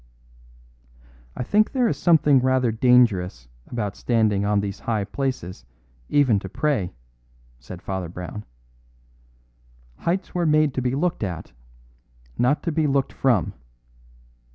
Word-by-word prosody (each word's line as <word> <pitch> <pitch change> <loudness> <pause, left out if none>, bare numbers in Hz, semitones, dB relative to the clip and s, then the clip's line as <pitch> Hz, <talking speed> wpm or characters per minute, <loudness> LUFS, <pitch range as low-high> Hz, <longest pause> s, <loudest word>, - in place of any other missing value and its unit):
"I - - -3
think 210 - +2
there 255 -3 +2
is - - 0
something 150 -5 +4
rather 130 -2 +2
dangerous 110 - +2 0.2
about 105 -4 -3
standing 110 -4 +1
on 105 0 +2
these 100 0 -4
high 110 -3 -1
places 100 - -4 0.5
even 130 -8 +3
to 95 - -8
pray," 105 - -1 0.6
said 85 +9 -10
Father 95 -3 -4
Brown. 90 +4 -7 1.6
"Heights 180 +2 -2
were 175 -2 0
made 155 -2 +3
to 130 - -2
be 125 +1 -1
looked 175 +4 -1
at, 85 -7 -5 0.8
not 125 +5 +1
to 170 - -1
be 155 0 +1
looked 135 -1 0
from." 120 -10 +1
125 Hz, 130 wpm, -23 LUFS, 100-145 Hz, 1.6 s, something